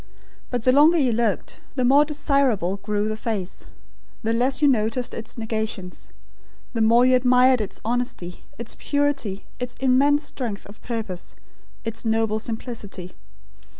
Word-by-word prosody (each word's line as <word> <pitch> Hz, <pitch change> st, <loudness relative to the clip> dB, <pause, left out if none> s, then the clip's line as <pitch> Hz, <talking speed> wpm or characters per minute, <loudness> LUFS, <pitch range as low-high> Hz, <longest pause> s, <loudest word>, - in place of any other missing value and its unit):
But 245 Hz, -2 st, -2 dB
the 255 Hz, -, +5 dB
longer 300 Hz, +6 st, +6 dB
you 265 Hz, -6 st, +3 dB
looked, 225 Hz, -3 st, -1 dB, 0.2 s
the 255 Hz, -2 st, +1 dB
more 280 Hz, +4 st, +6 dB
desirable 275 Hz, -, +1 dB
grew 205 Hz, +1 st, -1 dB
the 215 Hz, -, -2 dB
face; 215 Hz, -4 st, -4 dB, 0.6 s
the 225 Hz, +1 st, +1 dB
less 250 Hz, +3 st, +1 dB
you 295 Hz, -, +4 dB
noticed 240 Hz, -1 st, +1 dB
its 225 Hz, -, -7 dB
negations; 220 Hz, -5 st, -4 dB, 0.6 s
the 230 Hz, -, -1 dB
more 230 Hz, +3 st, +5 dB
you 255 Hz, 0 st, +5 dB
admired 250 Hz, 0 st, +4 dB
its 205 Hz, -, -5 dB
honesty, 230 Hz, -7 st, -3 dB
its 235 Hz, -, -5 dB
purity, 285 Hz, -9 st, -1 dB
its 250 Hz, -1 st, -4 dB
immense 275 Hz, +3 st, +3 dB
strength 225 Hz, -6 st, -4 dB
of 205 Hz, +2 st, -14 dB
purpose; 220 Hz, -7 st, -5 dB, 0.5 s
its 225 Hz, 0 st, -4 dB
noble 225 Hz, -1 st, +1 dB
simplicity. 220 Hz, -5 st, -6 dB
235 Hz, 145 wpm, -23 LUFS, 215-255 Hz, 0.6 s, longer